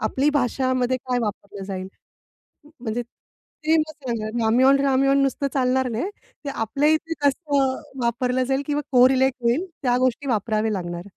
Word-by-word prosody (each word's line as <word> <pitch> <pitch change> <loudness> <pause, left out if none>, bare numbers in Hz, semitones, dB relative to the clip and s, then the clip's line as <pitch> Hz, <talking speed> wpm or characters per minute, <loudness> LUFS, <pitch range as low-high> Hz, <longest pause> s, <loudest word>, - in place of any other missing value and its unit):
आपली 265 +7 +1
भाषामध्ये 255 -1 +1
काय 250 0 -2
वापरलं 200 -2 -5
जाईल. 190 -1 -5 0.8
म - - -17
म्हणजे 240 0 -2 0.6
ते 320 +1 +5
मग 310 0 -1 0.2
झालं. 225 -1 -3
रामेन, 260 +5 +4
रामेन 275 +1 +3
नुसतं 275 +1 0
चालणार 260 -1 +1
नाही. 240 - -2 0.3
ते 285 - -4
आपल्या 275 +5 0
इथे 325 +1 0
कसं 280 -2 +1 0.3
वापरलं 250 +2 0
जाईल 270 +2 0
किंवा 295 0 -1
कोरिलेट 260 +1 +5
होईल 240 +9 +1 0.2
त्या 245 -2 +2
गोष्टी 255 +2 0
वापराव्या 220 -1 0
लागणार. 175 -3 -4
255 Hz, 150 wpm, -23 LUFS, 230-275 Hz, 0.8 s, ते